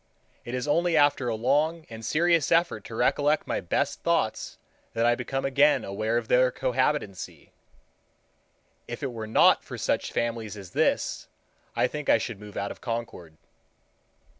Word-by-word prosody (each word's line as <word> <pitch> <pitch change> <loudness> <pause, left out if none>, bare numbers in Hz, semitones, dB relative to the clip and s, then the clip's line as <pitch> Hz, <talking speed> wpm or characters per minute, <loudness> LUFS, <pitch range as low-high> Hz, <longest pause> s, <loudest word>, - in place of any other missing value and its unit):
It 120 - -5
is 125 +3 -3
only 165 +2 +2
after 145 -3 +3
a 115 - 0
long 150 +8 +1
and 115 -1 -10
serious 165 +4 +2
effort 165 - +2
to 110 - -8
recollect 145 +5 +2
my - - -2
best 90 - -1
thoughts - - -1 0.4
that 115 +1 +1
I 120 - +5
become 135 +2 -3
again 140 +2 +3
aware 110 +4 -1
of 120 -2 -3
their 125 +1 +4
cohabitancy. 130 -7 -2 1.4
If 120 +4 -7
it 135 - -2
were 110 -2 -6
not 110 - +5
for - - -8
such - - -1
families 115 -3 -3
as 95 -3 -10
this, - - 0 0.5
I - - +3
think 150 -1 -4
I - - +6
should 110 -2 -5
move 105 -1 -10
out 100 0 -2
of - - -11
Concord. 115 -9 -5
120 Hz, 165 wpm, -26 LUFS, 110-145 Hz, 1.4 s, I